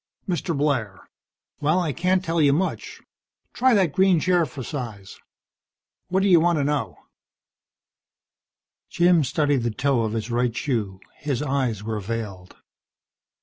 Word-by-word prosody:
"Mr. 175 -3 -2
Blair. 125 -9 -1 0.5
Well, 155 +5 +2
I 160 -5 -1
can't 185 +3 0
tell 165 0 0
you 140 -2 +4
much. 185 +6 -3 0.5
Try 255 -1 +3
that 185 -6 +2
green 190 -3 +4
chair 175 0 +2
for 130 0 -8
size. 115 -9 -7 0.9
What 190 +1 +1
do - - +3
you 175 -3 +6
want 170 0 +2
to 145 - +1
know?" 145 0 -2 1.9
Jim 175 -2 +3
studied 145 0 +1
the 120 - 0
toe 130 +2 0
of 110 -1 -2
his 115 +1 -3
right 120 0 0
shoe. 105 -9 -2 0.2
His 145 -1 -2
eyes 130 -7 -1
were 110 0 -3
veiled. 100 -3 -6
145 Hz, 145 wpm, -23 LUFS, 115-170 Hz, 1.9 s, you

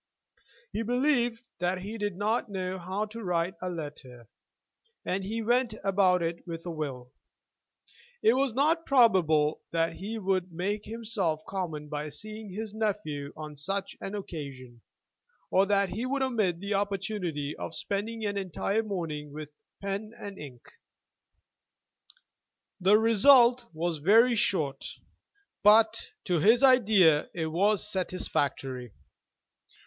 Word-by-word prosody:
He 215 - -1
believed 245 0 +1 0.2
that 180 +1 -1
he 215 +4 -6
did 205 -2 -2
know 200 -3 -1
how 190 +4 -2
to 225 +2 -9
write 175 0 0
a 185 - -2
letter, 145 -8 -8 0.8
and 190 +1 -1
he 220 +4 -3
went 240 0 +1
about 190 -2 +3
it 165 +1 -2
with 165 0 -6
a 175 - -3
will. 135 -6 -5 1.1
It 225 - +6
was 270 0 +1
not 320 +5 +2
probable 175 - +4
that 165 0 0
he 215 +4 -5
would 185 -3 -1
make 200 +5 -3
himself 210 -8 -2
common 165 -6 -4
by 150 0 -4
seeing 215 +5 -8
his 215 +2 -5
nephew 200 -10 -2
on 155 -1 -7
such 195 +7 -3
an 195 - -5
occasion, 135 - -8 0.7
or 195 +1 +4
that 200 -1 +2
he 235 +5 -3
would 275 +1 0
omit 215 -10 0
the 200 +2 -3
opportunity 195 -7 -2
of 165 - -6
spending 220 +3 -3
an 200 -1 -1
entire 195 +3 -1
morning 165 -8 -4
with 150 0 -8 0.3
pen 200 +3 -4
and 200 -1 -8
ink. 130 -5 -10 2.2
The 195 +3 +5
result 240 +2 +6
was 165 0 -2
very 225 +10 +5
short, 165 -10 0 0.8
but, 220 +2 +5 0.2
to 175 -3 +1
his 225 - +5
idea, 210 - +5
it 160 -2 -2
was 200 +5 +2
satisfactory. 140 - -2
195 Hz, 130 wpm, -28 LUFS, 165-220 Hz, 2.2 s, It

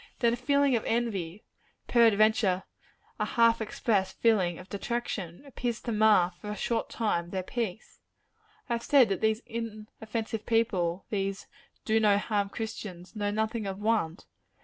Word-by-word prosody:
Then 235 -1 +2
a - - +1
feeling 280 +2 +2
of 225 - 0
envy 210 -6 -2 0.4
peradventure 215 -4 +4 0.6
a - - +1
half 230 -1 +3
expressed 210 -2 -1
feeling 190 -7 +3
of 185 - -11
detraction 200 - -4
appears 245 -4 -3
to 235 - -3
mar, 210 -5 +4
for 210 - -6
a 210 - -3
short 230 +2 -1
time, 175 -7 -1
their 185 0 -3
peace. 220 0 -5 0.7
I 240 - -1
have 235 - -1
said 270 -6 +5
that 195 - -1
these 220 +1 +1
inoffensive 220 -1 -5
people 190 -6 +1
these 195 -1 -2 0.4
do 220 0 +3
no 210 -2 +4
harm 205 -1 -1
Christians 205 -4 -7
know 205 -1 -1
nothing 220 +1 -1
of 190 -1 -4
want. 205 -5 0
215 Hz, 150 wpm, -29 LUFS, 195-230 Hz, 0.7 s, said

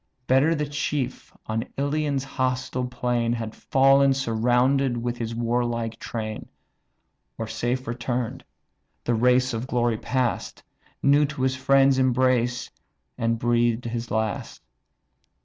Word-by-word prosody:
Better 135 +6 +3
the 150 -1 -1
chief, 145 -2 -3
on 110 +1 -2
Ilion's 145 -1 0
hostile 130 -1 -2
plain, 120 -2 0
Had 115 -2 -4
fall'n 135 0 +4
surrounded 125 +1 +2
with 120 +1 -3
his 115 -1 -3
warlike 115 -1 -1
train; 110 -2 -5 0.9
Or 115 - -3
safe 120 +3 -2
return'd, 120 0 -3 0.6
the 120 - 0
race 125 +2 +3
of 115 +3 -3
glory 120 -3 0
pass'd, 125 0 -2 0.4
New 145 +2 +5
to 145 -2 -4
his 130 0 +1
friends' 135 0 +4
embrace, 125 -1 +1 0.4
and 115 0 0
breathed 120 0 +1
his 120 0 -4
last! 110 -3 -3
125 Hz, 120 wpm, -25 LUFS, 115-130 Hz, 0.9 s, New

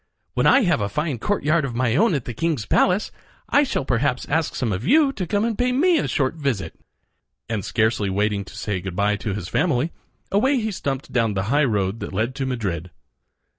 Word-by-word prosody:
"When - - +2
I 275 - +6
have 175 - +2
a 100 - -1
fine 150 +2 -2
courtyard 165 - +1
of 125 -4 -4
my 120 -1 +1
own 205 0 +3
at 135 - -3
the 120 - -5
king's 150 -3 -1
palace, 185 - +2 0.4
I 285 - +5
shall 260 - -1
perhaps 130 +1 0
ask 160 +1 0
some 115 -5 -1
of 95 +4 -3
you 285 - +4
to 185 -8 -4
come 205 +5 +1
and 230 -2 -1
pay 250 +3 +1
me 325 +6 +3
a - - -1
short 135 -2 0
visit." 140 -11 -2 0.7
And 110 -3 -2
scarcely 110 -2 +1
waiting 100 +1 0
to - - -13
say 105 -4 -2
good 95 -1 -6
by 105 +1 +2
to 100 0 -3
his 100 -4 -5
family, 155 - +1 0.4
away 260 +8 +3
he 220 -1 -2
stumped 140 -7 -4
down 115 -4 +1
the 95 - 0
high 150 0 +4
road 105 -3 0
that - - -6
led 110 +6 -1
to 135 0 -3
Madrid. 95 -9 -3
130 Hz, 215 wpm, -22 LUFS, 105-175 Hz, 0.7 s, I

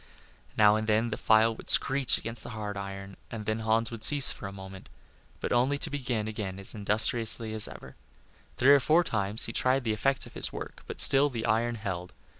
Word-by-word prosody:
Now 105 0 +4
and 110 0 -5
then 110 +2 0
the - - -2
file 110 +1 +2
screeched 135 -2 +4
against 115 0 +2
the - - -9
hard 105 -1 -6
iron, 100 0 -8
and 110 -2 -8
then 110 +1 -3
Hans 110 +1 0
would 115 -2 -9
cease 140 +4 +4
for 95 - -8
a - - -9
moment, 95 -5 -12 0.5
but - - -5
only 130 +4 +1
to - - -5
begin 125 -6 -4
again 105 -3 -6
as 100 - +2
industriously 110 +1 +2
as 110 -1 +2
ever. - - -13 0.6
Three 135 +3 +5
or 140 - +5
four 160 +5 +2
times 105 - -1
he 115 - -7
tried 130 +2 0
the 110 -2 -2
effects 135 +5 -1
of - - -15
his - - +1
work, - - -9
but - - -9
still 140 +2 +5
the 115 -4 -5
iron 115 +1 -1
held. 90 -4 -7
110 Hz, 210 wpm, -27 LUFS, 105-120 Hz, 0.6 s, Three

